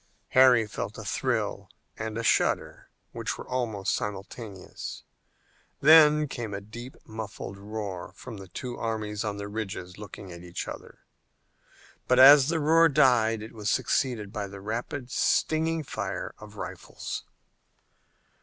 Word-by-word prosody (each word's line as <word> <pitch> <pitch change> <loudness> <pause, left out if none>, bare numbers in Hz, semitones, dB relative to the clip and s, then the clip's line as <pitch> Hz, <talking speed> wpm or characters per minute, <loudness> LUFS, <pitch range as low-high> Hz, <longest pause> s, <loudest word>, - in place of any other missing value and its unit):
Harry 130 -3 +6
felt 105 - -5
a - - -7
thrill - - -1 0.3
and 110 0 -4
a 115 - -2
shudder - - +1 0.2
which - - -3
were - - -9
almost 115 -6 -1
simultaneous. 100 0 -6 0.8
Then 150 0 +7
came 115 -6 -5
a - - -3
deep 120 +6 -10
muffled 110 -3 -7
roar 100 -3 -5
from 120 -4 -9
the 95 -1 -10
two 120 +6 -6
armies 110 -2 -2
on 105 -2 -3
the 100 0 -5
ridges 100 -3 -5
looking 105 -2 -9
at 85 0 -9
each 90 0 -6
other. - - -9 1.1
But 125 - +4
as 135 +1 +9
the 165 -1 +1
roar 165 +2 +5
died 115 -6 +4
it 110 - -10
was 105 -2 -3
succeeded 110 -7 0
by 105 -1 -3
the 100 0 -9
rapid, 120 +5 -4
stinging 160 0 +1
fire 100 -7 -4
of 105 0 -12
rifles. - - -6
110 Hz, 140 wpm, -28 LUFS, 100-130 Hz, 1.1 s, as